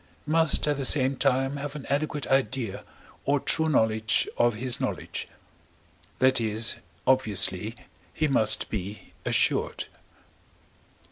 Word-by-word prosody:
must 160 Hz, -1 st, +3 dB
at 145 Hz, -1 st, 0 dB
the 140 Hz, -, -3 dB
same 135 Hz, 0 st, +4 dB
time 135 Hz, +2 st, 0 dB
have 145 Hz, +1 st, -6 dB
an 150 Hz, -, -8 dB
adequate 145 Hz, -1 st, -2 dB
idea 130 Hz, -5 st, -1 dB, 0.4 s
or 145 Hz, +1 st, +1 dB
true 160 Hz, +3 st, +1 dB
knowledge 110 Hz, -5 st, +2 dB
of 120 Hz, -2 st, +2 dB
his 125 Hz, +2 st, 0 dB
knowledge; -, -, -4 dB, 0.9 s
that 130 Hz, -1 st, +2 dB
is, 110 Hz, +1 st, +1 dB, 0.3 s
obviously, 105 Hz, -4 st, +1 dB, 0.4 s
he 155 Hz, -, -1 dB
must 135 Hz, -6 st, +4 dB
be 105 Hz, 0 st, -7 dB
assured. -, -, 0 dB
130 Hz, 120 wpm, -26 LUFS, 110-145 Hz, 0.9 s, same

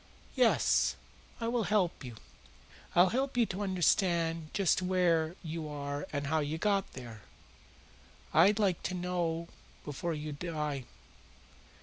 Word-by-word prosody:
"Yes, -, -, +3 dB, 0.4 s
I 230 Hz, -, -2 dB
will 235 Hz, -2 st, 0 dB
help 190 Hz, -8 st, +1 dB
you. 120 Hz, -3 st, -8 dB, 0.8 s
I'll 180 Hz, +2 st, +6 dB
help 265 Hz, +3 st, -1 dB
you 235 Hz, -, +5 dB
to 195 Hz, -1 st, -5 dB
understand 170 Hz, -3 st, +1 dB
just 190 Hz, -2 st, +2 dB
where 175 Hz, -3 st, +2 dB
you 160 Hz, -1 st, -4 dB
are 145 Hz, 0 st, -4 dB
and 145 Hz, -1 st, -2 dB
how 160 Hz, +3 st, +1 dB
you 150 Hz, +1 st, -2 dB
got 200 Hz, +2 st, 0 dB
there. 120 Hz, -4 st, -9 dB, 1.1 s
I'd 205 Hz, +2 st, +6 dB
like 195 Hz, -5 st, +2 dB
you 185 Hz, -, -4 dB
to -, -, -3 dB
know 170 Hz, -2 st, -1 dB, 0.4 s
before 155 Hz, +3 st, -3 dB
you 150 Hz, 0 st, -5 dB
die." 150 Hz, -4 st, -3 dB
170 Hz, 135 wpm, -31 LUFS, 150-190 Hz, 1.1 s, I'll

